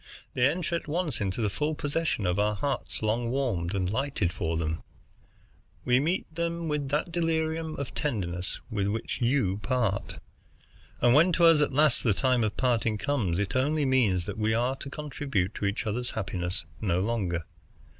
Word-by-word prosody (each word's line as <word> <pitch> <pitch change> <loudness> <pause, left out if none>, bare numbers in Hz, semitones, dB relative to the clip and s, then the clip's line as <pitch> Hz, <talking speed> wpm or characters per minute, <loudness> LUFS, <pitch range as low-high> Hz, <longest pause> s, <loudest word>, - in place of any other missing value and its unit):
They 125 +2 +4
enter 170 +1 -1
at 165 - -4
once 155 - -1
into 100 +3 -1
the 105 - +2
full 150 +7 -1
possession 145 - -1
of 90 +1 +1
hearts 105 +5 -1
long 115 +2 +1
warmed 110 -9 -1
and 95 -2 0
lighted 110 -4 -1
for 80 -1 -1
them. 80 0 -2 1.0
We 125 0 +4
meet 170 +7 0
with 165 -4 -1
that 150 +4 0
delirium 160 -1 0
of 140 -3 -5
tenderness 90 -10 -2
with 100 -2 0
which 110 +5 -3
you 120 -6 +2
part. 110 -5 -1 0.8
And 120 0 +5
when 165 +6 +6
to 170 - +4
us 165 -2 +7
at 145 - +2
last 145 -1 +3
the 110 -5 +3
time 130 -1 +2
of 105 -1 -1
parting 115 -4 +1
comes, 105 -10 0
it 100 +2 -1
only 145 +3 +2
means 110 -10 +2
that 105 +1 -5
we 110 +1 +2
are 125 +3 +1
to 135 - -7
contribute 140 - -2
to - - -3
each 100 +4 -1
other's 120 +3 -2
happiness 90 -3 -3 0.2
no 90 -5 +1
longer. 95 -5 -1
120 Hz, 175 wpm, -28 LUFS, 100-145 Hz, 1.0 s, us